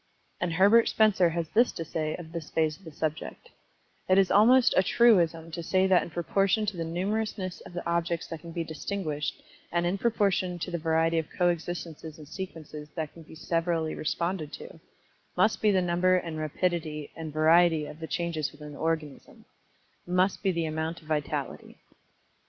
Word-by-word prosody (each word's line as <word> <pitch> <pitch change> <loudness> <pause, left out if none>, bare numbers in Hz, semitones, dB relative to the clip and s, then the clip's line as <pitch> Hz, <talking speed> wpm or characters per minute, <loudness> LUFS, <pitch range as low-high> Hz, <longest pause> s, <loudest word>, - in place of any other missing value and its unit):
And 175 -1 -1
Herbert 205 +7 +5
Spencer, 205 -5 +4
has 165 0 -2
this 235 +3 +3
to 165 - -5
say 155 0 -2
of 165 -2 -10
this 165 -2 -6
phase 155 -1 +1
of 190 - -21
the 160 - -8
subject, 155 +1 -5 0.6
"It 185 - +5
is 195 -1 +4
almost 240 +5 +6
a - - +6
truism 170 -7 +3
to 170 - -5
say 185 +3 +2
that 190 -2 +4
in - - -6
proportion 195 +5 +1
to 205 -2 -3
the 165 - -3
numerousness 185 +1 -2
of - - -13
the 175 - -5
objects 170 0 -1
that 165 - -6
can 170 +1 -10
be 165 0 -2
distinguished, 160 -2 -4 0.3
and 175 0 +1
in 185 +3 0
proportion 195 -6 +1
to 175 +1 -5
the 170 - -2
variety 165 +1 +2
of 160 - -5
coexistences 170 -3 -2
and 150 -2 -12
sequences 155 -4 -8
that 160 -3 -4
can 165 - -13
be 160 - -13
severally 165 -1 -1
responded 170 0 -2
to, 485 - -10 0.6
must 215 0 +3
be 215 - +4
the 190 -2 +3
number 175 +1 +3
and 165 -3 -2
rapidity 155 -1 -2
and 160 -1 -6
variety 160 +1 +4
of 150 - -10
the 160 - -6
changes 165 -4 -2
within 150 0 -11
the 145 - -11
organism 160 -3 -4 0.6
must 185 +2 +1
be 195 - +2
the 170 -2 -1
amount 160 +1 -3
of - - -18
vitality." 150 -2 -3
170 Hz, 185 wpm, -28 LUFS, 160-185 Hz, 0.6 s, almost